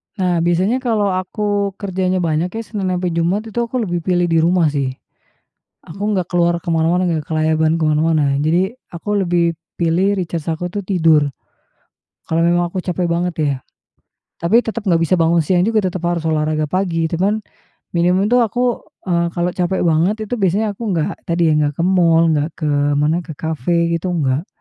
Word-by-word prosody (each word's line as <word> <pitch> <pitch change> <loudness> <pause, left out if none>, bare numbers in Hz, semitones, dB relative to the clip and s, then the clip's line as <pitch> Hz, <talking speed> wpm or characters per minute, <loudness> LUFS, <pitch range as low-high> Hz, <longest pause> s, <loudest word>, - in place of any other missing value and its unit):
Nah 180 -4 0
biasanya 180 +8 +1
kalau 220 -6 0
aku 200 +1 -2
kerjanya 185 -2 -1
banyak 160 +2 0
ya 225 - -3
Senin 205 -4 -4
sampai 180 -1 -1
Jumat 170 +6 0
itu 240 - -3
aku 235 0 -1
lebih 175 -3 -2
pilih 175 +1 +1
di 165 - +4
rumah 165 -2 +3
sih. 135 -3 -2 0.9
Aku 200 +6 -4
nggak 185 -4 -1
keluar 175 -1 +2
ke - - -22
mana-mana, 170 +3 +2
enggak 160 -3 -1
kelayaban 160 0 +1
ke 160 - +1
mana-mana, 150 -2 +2
jadi 175 +8 +1 0.2
aku 205 +5 -3
lebih 170 -1 +1 0.2
pilih 175 +4 +2
recharge 170 -3 -3
aku 160 +2 -3
tuh 200 +2 -5
tidur, 160 -6 +3 1.0
kalau 165 +1 +1
memang 175 +1 +2
aku 180 +1 -4
capek 180 -1 -1
banget 170 0 -1
ya. 145 -3 +1 0.8
Tapi 195 +8 +3
tetap 230 -2 -4
nggak 170 -5 +2
bisa 170 +2 +2
bangun 170 0 +3
siang 175 +3 +2
juga 215 -2 +1
tetap 180 -1 -5
harus 170 -2 -1
olahraga 155 -1 0
pagi 165 -1 0
cuman, 195 +6 0 0.5
minimum 180 +5 +2
itu 250 - +5
aku, 245 +1 0 0.2
eee, 170 -2 +1
kalau 175 +1 0
capek 180 +1 -1
banget 170 +5 +2
itu - - -3
biasanya 205 +3 +1
aku 215 +4 -9
nggak, 155 - -1
tadi 170 -1 +2
ya - - +3
nggak 145 -1 +1
ke 170 - -1
mal, 170 -3 +4
nggak 150 +1 0
ke 155 -2 -2 0.3
mana 150 +4 +2
ke 160 -4 -8
kafe 170 +2 -1
gitu 170 +2 -1
enggak. 145 +2 0
175 Hz, 185 wpm, -18 LUFS, 160-190 Hz, 1.0 s, itu